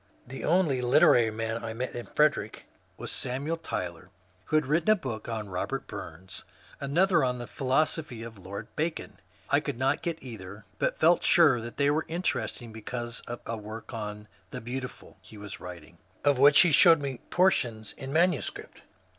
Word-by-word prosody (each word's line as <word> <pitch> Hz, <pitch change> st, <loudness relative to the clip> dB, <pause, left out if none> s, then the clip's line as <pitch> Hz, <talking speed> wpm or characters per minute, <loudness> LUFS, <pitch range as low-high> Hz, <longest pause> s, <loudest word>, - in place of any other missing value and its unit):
The 135 Hz, +2 st, -8 dB
only 160 Hz, -7 st, +2 dB
literary 125 Hz, -2 st, +5 dB
man 115 Hz, +1 st, -3 dB
I 115 Hz, -1 st, -4 dB
met 125 Hz, +2 st, -4 dB
in 120 Hz, -, -6 dB
Frederick 150 Hz, -8 st, +1 dB, 0.3 s
was -, -, -6 dB
Samuel 140 Hz, +6 st, -2 dB
Tyler, 90 Hz, -, -5 dB, 0.4 s
who -, -, -1 dB
had 155 Hz, -2 st, +3 dB
written 160 Hz, +7 st, +1 dB
a 215 Hz, -, +7 dB
book 120 Hz, -, -6 dB
on 110 Hz, -2 st, -3 dB
Bobert 90 Hz, -3 st, -3 dB
Bums, 95 Hz, +4 st, -8 dB, 0.4 s
another 170 Hz, +6 st, +2 dB
on 125 Hz, -1 st, 0 dB
the 120 Hz, -, -6 dB
Philosophy 135 Hz, -1 st, -1 dB
of 115 Hz, -3 st, -10 dB
Lord 95 Hz, +2 st, -7 dB
Bacon. 160 Hz, +2 st, -3 dB, 0.3 s
I 140 Hz, -, +5 dB
could 145 Hz, -4 st, -4 dB
not 130 Hz, +2 st, +1 dB
get 170 Hz, -2 st, -2 dB
either, 105 Hz, -4 st, -9 dB
but -, -, 0 dB
felt 170 Hz, +2 st, +4 dB
sure 145 Hz, -9 st, +5 dB
they 140 Hz, +5 st, 0 dB
were 155 Hz, +2 st, 0 dB
interesting 160 Hz, -8 st, -3 dB
because 120 Hz, +2 st, -5 dB
of 120 Hz, 0 st, -6 dB
a 115 Hz, -, -3 dB
work 110 Hz, +2 st, -8 dB
on 105 Hz, -2 st, -5 dB
^^ -, -, -22 dB, 0.2 s
The 125 Hz, -, -6 dB
Beautiful 125 Hz, +2 st, -7 dB
" -, -, -37 dB
he 110 Hz, -, -14 dB
was 105 Hz, -1 st, -8 dB
writing, 85 Hz, -2 st, -10 dB, 0.2 s
of 145 Hz, -3 st, +3 dB
which 140 Hz, +1 st, +8 dB
he 175 Hz, -, +4 dB
showed 165 Hz, +2 st, +7 dB
me 135 Hz, -4 st, -4 dB
portions 120 Hz, -, +1 dB
in 135 Hz, 0 st, -7 dB
manuscript. 170 Hz, -2 st, 0 dB
125 Hz, 180 wpm, -28 LUFS, 110-150 Hz, 0.4 s, which